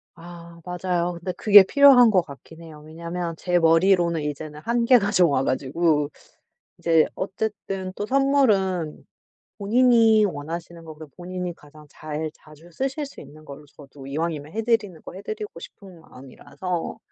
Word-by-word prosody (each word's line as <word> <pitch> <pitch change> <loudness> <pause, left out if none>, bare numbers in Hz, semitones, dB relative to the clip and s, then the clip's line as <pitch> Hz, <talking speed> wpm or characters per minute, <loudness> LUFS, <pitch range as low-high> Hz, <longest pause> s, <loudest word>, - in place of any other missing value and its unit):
아 170 0 -13
맞아요. 180 -1 -2
근데 170 +2 -5
그게 205 0 +7
필요한 260 +2 +6
것 190 -4 +3
같긴 160 +2 -14
해요. 155 -2 -12
왜냐하면 170 +1 -6
제 175 -1 0
머리로는 170 0 +3
이제는 150 +1 -6
한계가 235 -2 +2
좀 175 -5 +4
와 135 -1 +1
가지고. 145 +3 0 0.7
이제 165 -2 +3
어쨌든 195 -1 -4
또 205 - -4
선물은 215 - +1 0.6
본인이 225 0 +4
원하시는 170 +1 -7
거 160 -1 -10
그리고 155 -1 -13
본인이 180 -1 -6
가장 150 0 -17
잘 155 +1 -6
자주 155 +2 -18
쓰실 275 - -3
수 - - -13
있는 155 +1 -14
걸로 145 0 -11
저도 140 -1 -15
이왕이면 155 0 -4
해드리는 220 -6 -1
거 - - -11
해드리고 205 -2 -7
싶은 185 -3 -13
마음이라서 145 +5 -7
175 Hz, 325 characters per minute, -23 LUFS, 155-200 Hz, 0.7 s, 그게